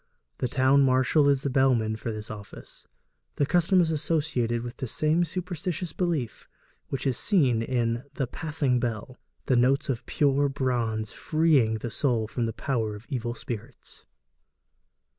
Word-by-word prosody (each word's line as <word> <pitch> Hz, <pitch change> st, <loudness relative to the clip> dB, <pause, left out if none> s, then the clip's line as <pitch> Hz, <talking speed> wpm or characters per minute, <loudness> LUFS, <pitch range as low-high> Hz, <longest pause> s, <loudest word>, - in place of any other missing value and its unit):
The 125 Hz, -, 0 dB
town 130 Hz, +2 st, +3 dB
marshal 135 Hz, +2 st, +4 dB
is 140 Hz, -1 st, +2 dB
the 140 Hz, -, -1 dB
bellman 125 Hz, -5 st, +2 dB
for 115 Hz, +1 st, -4 dB
this 105 Hz, -1 st, -6 dB
office. 105 Hz, -1 st, -11 dB, 0.5 s
The 145 Hz, -, +2 dB
custom 175 Hz, +4 st, +3 dB
is 165 Hz, -2 st, +1 dB
associated 145 Hz, -7 st, 0 dB
with 120 Hz, 0 st, -7 dB
the 130 Hz, -, -4 dB
same 155 Hz, +8 st, +1 dB
superstitious 175 Hz, -1 st, -4 dB
belief 160 Hz, -11 st, -2 dB, 0.4 s
which 135 Hz, 0 st, -4 dB
is 130 Hz, -3 st, +1 dB
seen 135 Hz, -, +2 dB
in 120 Hz, 0 st, -1 dB
the 135 Hz, -, 0 dB
'passing 140 Hz, -1 st, -1 dB
bell,' 120 Hz, +2 st, -4 dB, 0.3 s
the 130 Hz, -, +2 dB
notes 135 Hz, +4 st, +2 dB
of 120 Hz, -4 st, -3 dB
pure 145 Hz, -1 st, +2 dB
bronze 120 Hz, -5 st, -1 dB
freeing 155 Hz, -8 st, +2 dB
the 115 Hz, +1 st, -5 dB
soul 120 Hz, -3 st, 0 dB
from 115 Hz, +1 st, -2 dB
the -, -, -2 dB
power 110 Hz, -6 st, -2 dB
of 105 Hz, +3 st, -12 dB
evil 120 Hz, -4 st, -3 dB
spirits. 120 Hz, +1 st, -8 dB
130 Hz, 155 wpm, -27 LUFS, 115-150 Hz, 0.5 s, marshal